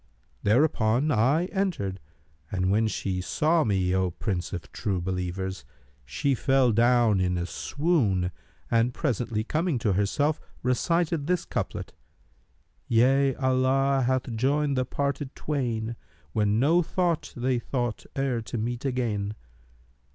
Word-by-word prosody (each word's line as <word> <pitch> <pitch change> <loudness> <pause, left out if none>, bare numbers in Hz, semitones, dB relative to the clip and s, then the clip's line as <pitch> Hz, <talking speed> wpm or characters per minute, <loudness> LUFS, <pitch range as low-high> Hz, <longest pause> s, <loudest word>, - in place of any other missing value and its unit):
Thereupon 125 +2 +2
I 135 +8 +3
entered, 165 - -1 0.5
and 95 -1 0
when 110 +2 +3
she 95 -3 -2
saw 155 - +2
me, 95 -5 +1
O 95 -1 +2
Prince 90 0 -3
of 90 -3 -6
True 95 -3 -2
Believers, 95 +1 -3 0.4
she 75 - 0
fell 135 -1 +3
down 115 -2 +4
in 90 -1 +1
a 85 - -1
swoon, 110 - 0 0.4
and 115 +2 +2
presently 115 -6 -1
coming 155 +4 0
to 115 -4 +1
herself, 145 +11 +1 0.2
recited 160 +4 +1
this 180 -1 0
couplet, - - -4 0.9
'Yea, 135 +3 +3
Allah 130 +1 +2
hath 130 -2 0
joined 140 +4 +1
the 130 0 +1
parted 140 +1 -3
twain, 120 -6 -2 0.2
* 70 +1 -33
When 105 0 +2
no 160 +7 +4
thought 175 -1 -1
they 125 0 +1
thought 120 -2 -3
e'er 135 -4 0
to 115 - -5
meet 120 +2 -3
again.' 110 -6 -1
120 Hz, 130 wpm, -27 LUFS, 100-140 Hz, 0.9 s, down